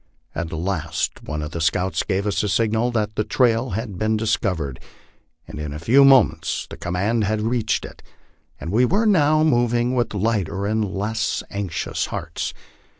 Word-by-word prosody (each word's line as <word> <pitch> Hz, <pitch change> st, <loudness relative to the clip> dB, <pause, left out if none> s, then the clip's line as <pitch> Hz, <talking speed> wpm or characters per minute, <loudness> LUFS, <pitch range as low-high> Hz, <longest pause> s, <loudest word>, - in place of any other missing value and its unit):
At 80 Hz, +1 st, -4 dB
last 85 Hz, -1 st, -2 dB
one 75 Hz, 0 st, -4 dB
of 75 Hz, -, -6 dB
the 85 Hz, -, -4 dB
scouts 85 Hz, +1 st, +1 dB
gave 95 Hz, -1 st, -1 dB
the 105 Hz, -, 0 dB
signal 110 Hz, +3 st, +1 dB
that 110 Hz, -2 st, -1 dB
the 105 Hz, -, +1 dB
trail 120 Hz, +1 st, +2 dB
had 105 Hz, -6 st, -5 dB
been 110 Hz, 0 st, +1 dB
discovered, 100 Hz, -, -1 dB, 0.7 s
and -, -, -8 dB
in 75 Hz, -1 st, -4 dB
a -, -, -5 dB
few 120 Hz, -, +5 dB
moments 115 Hz, -, +4 dB
the -, -, -9 dB
command 100 Hz, +6 st, -1 dB
had 110 Hz, +1 st, 0 dB
reached 115 Hz, -2 st, 0 dB
it, -, -, -12 dB, 0.6 s
and 80 Hz, -, -5 dB
we 115 Hz, +5 st, +3 dB
were 200 Hz, -, +2 dB
now 155 Hz, -6 st, +4 dB
moving 120 Hz, -4 st, +2 dB
with 120 Hz, -4 st, 0 dB
lighter 100 Hz, -2 st, -1 dB
and 110 Hz, +1 st, +1 dB
less 105 Hz, +2 st, -2 dB
anxious 95 Hz, -6 st, -3 dB
hearts. -, -, -4 dB
105 Hz, 165 wpm, -22 LUFS, 90-120 Hz, 0.7 s, few